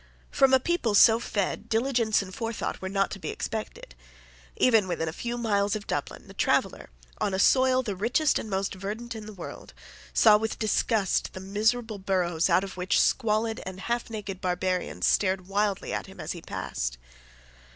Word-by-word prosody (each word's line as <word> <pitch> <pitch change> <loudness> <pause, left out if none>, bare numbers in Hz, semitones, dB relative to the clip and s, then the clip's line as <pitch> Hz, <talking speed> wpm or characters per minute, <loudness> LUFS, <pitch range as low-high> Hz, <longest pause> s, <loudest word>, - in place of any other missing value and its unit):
From 270 -1 +4
a 265 - +6
people 255 -8 0
so 225 +2 +7
fed 205 -4 -2
diligence 230 -2 +2
and 185 -1 -10
forethought 225 +2 -4
were 190 - -4
not 195 0 0
to 195 - -6
be - - -5
expected. 215 - -5 0.6
Even 225 -6 +4
within 165 -2 -2
a 160 - -3
few 240 +6 -4
miles 205 -3 +1
of 210 - -5
Dublin, - - -4
the - - -12
traveller, - - 0 0.3
on 195 - 0
a - - -1
soil 260 +5 +4
the 205 -5 -3
richest 245 +10 +1
and 220 - -7
most 195 0 -1
verdant 210 +5 -5
in 215 -2 -8
the - - -7
world, 185 -5 -10 0.4
saw 215 -2 +6
with 220 +1 -3
disgust 215 -1 0
the - - -7
miserable 215 +3 0
burrows 180 -3 0
out 180 +2 +4
of 195 -1 -7
which 180 +1 +1
squalid 225 -1 +1
and 190 0 -7
half 235 +4 -2
naked 205 -4 -6
barbarians 180 0 -1
stared 190 -2 +1
wildly 200 0 -1
at - - -3
him - - -14
as - - -4
he - - -6
passed. - - -4
210 Hz, 185 wpm, -27 LUFS, 190-230 Hz, 0.6 s, so